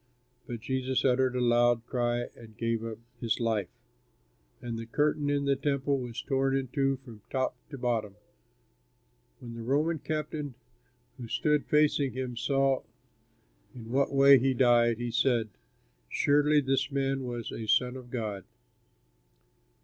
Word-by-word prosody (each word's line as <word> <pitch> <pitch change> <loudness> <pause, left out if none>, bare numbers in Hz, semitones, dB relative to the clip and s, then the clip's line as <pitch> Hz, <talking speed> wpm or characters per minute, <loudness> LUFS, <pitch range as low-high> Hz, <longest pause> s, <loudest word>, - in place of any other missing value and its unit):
But 120 -2 -6
Jesus 130 +2 -1
uttered 130 0 +2
a - - 0
loud 120 -1 +3
cry 120 -1 0
and 110 -2 -14
gave 115 -1 -1
up 115 -1 -5 0.2
his 115 -1 -1
life. 110 -5 0 0.9
And 120 -1 -5
the 115 - -7
curtain 150 +3 +1
of 145 -1 0
the 140 0 +3
Temple 140 0 0
was 120 -2 -5
torn 135 -1 +1
in 130 -2 -3
two 135 +1 +1
from 125 -4 -13
the 105 - -29
top 130 -1 0 0.2
to 140 - -7
the - - -14
bottom. 110 -5 -1 1.2
When 120 -1 -9
the 115 - -7
Roman 150 +7 +1
captain 150 -2 -4 0.6
who 120 - -6
stood 150 +5 +1
facing 150 -3 +2
him 130 -1 -4
saw 135 +3 +1 0.9
in 115 -2 -9
what 135 +2 +2
way 140 -1 +7
he 130 +1 +1
died, 120 -2 +4
he 120 0 -3
said, 115 -2 +1 0.6
"Surely 145 +1 +3
this 135 +1 0
man 135 -1 0
was 120 -2 -5
a 110 - -6
son 125 +3 +2
of 125 -2 -10
God." 110 -6 -4
130 Hz, 155 wpm, -29 LUFS, 120-140 Hz, 1.2 s, way